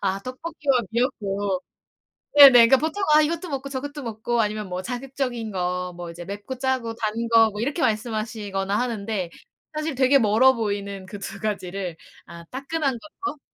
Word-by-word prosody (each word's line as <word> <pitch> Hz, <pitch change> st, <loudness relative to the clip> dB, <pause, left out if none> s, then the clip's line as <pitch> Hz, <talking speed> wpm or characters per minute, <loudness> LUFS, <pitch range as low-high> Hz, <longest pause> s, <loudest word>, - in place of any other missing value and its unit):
아 195 Hz, -1 st, 0 dB
떡볶이와 275 Hz, +1 st, -1 dB
미역국. 200 Hz, -6 st, -1 dB, 0.8 s
네네 280 Hz, -2 st, +12 dB, 0.2 s
그러니까 265 Hz, -, +6 dB
보통 320 Hz, +8 st, -2 dB
아 305 Hz, -, +7 dB
이것도 335 Hz, +4 st, -1 dB
먹고 275 Hz, -1 st, -4 dB
저것도 285 Hz, +1 st, -5 dB
먹고 230 Hz, +1 st, -2 dB
아니면 210 Hz, -2 st, -2 dB
뭐 180 Hz, 0 st, -3 dB
자극적인 245 Hz, -1 st, -4 dB
거, 180 Hz, -1 st, -2 dB
뭐 175 Hz, -1 st, -7 dB
이제 170 Hz, +1 st, -9 dB
맵고 205 Hz, +7 st, -6 dB
짜고 260 Hz, -3 st, -1 dB
단 215 Hz, -2 st, -2 dB, 0.2 s
거 225 Hz, -1 st, +6 dB
뭐 210 Hz, 0 st, -6 dB
이렇게 285 Hz, +6 st, -1 dB
말씀하시거나 215 Hz, -4 st, -1 dB
하는데 215 Hz, -6 st, -2 dB, 0.5 s
사실 305 Hz, -2 st, -2 dB
되게 270 Hz, +2 st, +5 dB
멀어 230 Hz, +4 st, +5 dB
보이는 200 Hz, -4 st, -3 dB
그 205 Hz, -, -7 dB
2 195 Hz, -, -7 dB
가지를 190 Hz, -4 st, -3 dB, 0.3 s
아 170 Hz, 0 st, -10 dB
따끈한 275 Hz, -, -2 dB
걸로 310 Hz, +2 st, -7 dB
225 Hz, 340 characters per minute, -24 LUFS, 200-265 Hz, 0.8 s, 네네